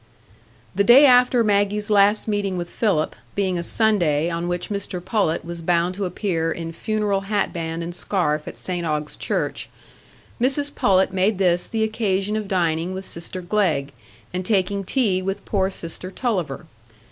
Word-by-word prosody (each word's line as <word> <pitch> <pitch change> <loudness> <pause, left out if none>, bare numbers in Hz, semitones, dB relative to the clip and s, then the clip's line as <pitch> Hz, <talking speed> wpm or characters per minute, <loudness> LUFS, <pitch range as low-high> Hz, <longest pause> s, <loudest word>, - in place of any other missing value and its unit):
The 200 +2 +2
day 245 +7 +8
after 250 -2 +5
Maggie's 205 0 +1
last 205 +1 +4
meeting 205 -3 -1
with 175 -1 -5
Philip, 190 -9 0 0.2
being 190 -3 0
a - - -1
Sunday 170 -6 +2
on 170 +1 -2
which 175 0 -3
Mr 200 -2 -3
Pullet 185 -3 -1
was 170 0 -6
bound 175 +1 +1
to 195 +1 -3
appear 175 -3 -1
in 165 0 -5
funeral 210 0 -1
hatband 170 -5 -2
and 170 +1 -5
scarf 160 -5 -1
at - - -7
St 180 -2 -4
Ogg's 150 -2 -2
church, - - -3 0.7
Mrs 285 +3 0
Pullet 190 -1 +2
made 190 +2 +1
this 180 -2 +2
the 225 -1 -1
occasion 210 -2 0
of 215 -2 -3
dining 175 -1 0
with 190 +1 -6
sister 180 +2 -6
Glegg, 175 -8 0 0.4
and 180 +1 -2
taking 195 0 0
tea 195 -4 +1
with 195 +1 -4
poor 190 -2 0
sister 180 0 -6
Tulliver. 190 - -2
190 Hz, 160 wpm, -22 LUFS, 170-210 Hz, 0.7 s, day